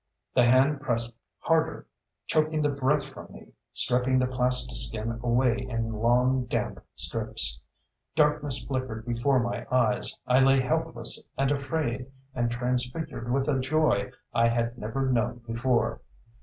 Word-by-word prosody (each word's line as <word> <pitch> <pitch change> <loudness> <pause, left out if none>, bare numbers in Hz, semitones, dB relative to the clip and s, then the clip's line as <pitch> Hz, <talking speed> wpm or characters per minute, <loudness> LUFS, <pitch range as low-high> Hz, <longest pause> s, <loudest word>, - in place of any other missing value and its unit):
The 125 - +5
hand 135 +4 +4
pressed 120 -4 -1 0.3
harder, 160 -1 +1 0.4
choking 155 0 +1
the 145 - +2
breath 140 +1 +1
from 135 -1 -11
me, - - -14 0.2
stripping 125 +1 +2
the 130 - +3
plastiskin 125 -3 0
away 120 0 +2
in 115 -3 -3
long, 125 +3 +2
damp 120 - -3
strips. 95 - -3 0.6
Darkness 150 -4 +2
flickered 130 -5 -3
before 125 +3 +2
my 120 0 -2
eyes. 120 -4 +1
I 125 +1 +4
lay 135 0 +5
helpless 130 -4 -1
and 135 +1 +2
afraid 135 -3 -2 0.3
and 120 -1 0
transfigured 125 +2 -2
with 135 +1 +1
a 140 -3 +2
joy 130 -7 +1 0.2
I 115 0 +4
had 115 0 0
never 125 +4 -2
known 120 0 0
before. 115 -1 0
125 Hz, 135 wpm, -27 LUFS, 115-135 Hz, 0.6 s, The